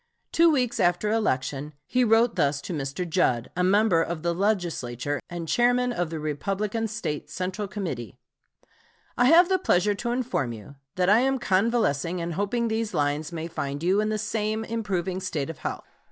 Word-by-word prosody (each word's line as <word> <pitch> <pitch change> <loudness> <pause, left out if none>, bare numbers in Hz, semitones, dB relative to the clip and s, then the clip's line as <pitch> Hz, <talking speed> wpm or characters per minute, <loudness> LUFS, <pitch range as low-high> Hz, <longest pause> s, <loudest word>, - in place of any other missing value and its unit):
Two 335 +1 +5
weeks 250 -6 +1
after 175 +2 +2
election 145 -8 -1
he 255 0 +1
wrote 225 0 +4
thus 140 0 +1
to 175 - -6
Mr. 145 +4 -3
Judd, 130 -9 +1
a 180 - +1
member 195 -2 +4
of 165 -1 -3
the 170 0 +1
Legislature 165 - -1
and 170 -2 -5
Chairman 245 +4 +2
of 175 -7 -1
the 160 -1 -4
Republican 195 +9 -2
State 210 -9 -4
Central 185 +3 -3
Committee: 160 - -5 1.0
"I 245 - +3
have 335 +6 +7
the 375 0 +2
pleasure 205 - +2
to 235 +4 -4
inform 240 - -1
you 110 +5 -11 0.2
that 185 +1 +2
I 215 - +6
am 270 +2 +2
convalescing 190 - +1
and 170 0 -3
hoping 205 +6 0
these 220 -3 -2
lines 145 +1 0
may 165 -1 -4
find 140 -2 -4
you 190 +4 +3
in 215 - 0
the 215 - 0
same 215 +1 -2
improving 195 -5 -2
state 165 -5 -3
of 165 - -14
health. - - -4
190 Hz, 180 wpm, -26 LUFS, 160-225 Hz, 1.0 s, have